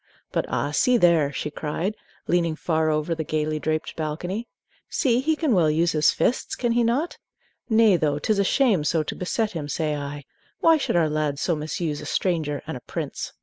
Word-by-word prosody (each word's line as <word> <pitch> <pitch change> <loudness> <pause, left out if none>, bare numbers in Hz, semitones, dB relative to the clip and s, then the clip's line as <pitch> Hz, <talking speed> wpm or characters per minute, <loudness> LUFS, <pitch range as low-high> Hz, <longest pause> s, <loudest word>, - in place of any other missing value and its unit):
But - - -1
ah, 145 - -1
see 250 +11 +3
there!" 170 -8 +4
she 150 +2 -4
cried, 165 +8 -3 0.3
leaning 170 -2 +1
far 160 -1 0
over 155 +2 0
the 160 -1 -3
gayly 155 0 -1
draped 155 +1 -2
balcony; 175 +8 -3 0.4
"see, 245 -5 +2
he 315 +4 +1
can 305 -5 +1
well 170 -5 +4
use 165 +3 +2
his 155 -1 +3
fists, 245 - 0
can 240 -2 0
he 240 +1 +3
not! 260 +9 0 0.5
Nay, 220 -4 +5
though, 150 -3 0
't 150 - -1
is 210 - +2
a - - +4
shame 210 - +3
so 155 +1 +1
to - - -4
beset 215 +4 -1
him, 150 -4 -5
say 155 +1 -1
I. 145 0 -5 0.4
Why 325 -1 +5
should 280 - -1
our 165 -2 +4
lads 150 -2 -1
so 170 - +1
misuse 150 0 -3
a - - -7
stranger 155 -6 -1
and 160 - -5
a - - -6
prince?" - - -5
160 Hz, 205 wpm, -24 LUFS, 150-215 Hz, 0.5 s, Nay